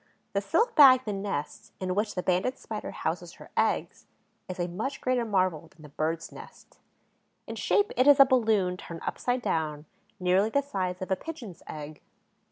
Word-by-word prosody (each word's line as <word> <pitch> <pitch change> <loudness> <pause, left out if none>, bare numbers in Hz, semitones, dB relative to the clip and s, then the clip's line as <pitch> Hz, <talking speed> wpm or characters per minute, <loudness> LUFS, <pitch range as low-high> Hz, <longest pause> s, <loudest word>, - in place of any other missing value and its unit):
The 200 - +1
silk 455 - +1
bag, 265 -4 +8
the 210 - -2
nest, 195 -7 -5
in 185 -1 -2
which 210 +2 -1
the 180 - -2
Banded 185 +9 0
Spider - - -6
houses - - -4
her - - -14
eggs, - - 0 0.4
is 185 - -6
a 175 - 0
much 215 +11 -4
greater 255 -2 0
marvel 185 -6 0
than 160 -1 -20
the 150 - -11
bird's 160 +3 -3
nest. - - -14 0.7
In - - -6
shape 415 +2 +1
it 255 - +3
is 285 -1 +7
a 275 - +10
balloon 220 -8 +2
turned 170 -2 -9
upside 245 0 -1
down, 155 -5 -2 0.3
nearly 185 +3 +3
the 280 +5 +1
size 185 -9 -3
of 185 - -7
a - - +4
pigeon's 235 - -9
egg. 150 0 -8
195 Hz, 180 wpm, -28 LUFS, 175-255 Hz, 0.7 s, a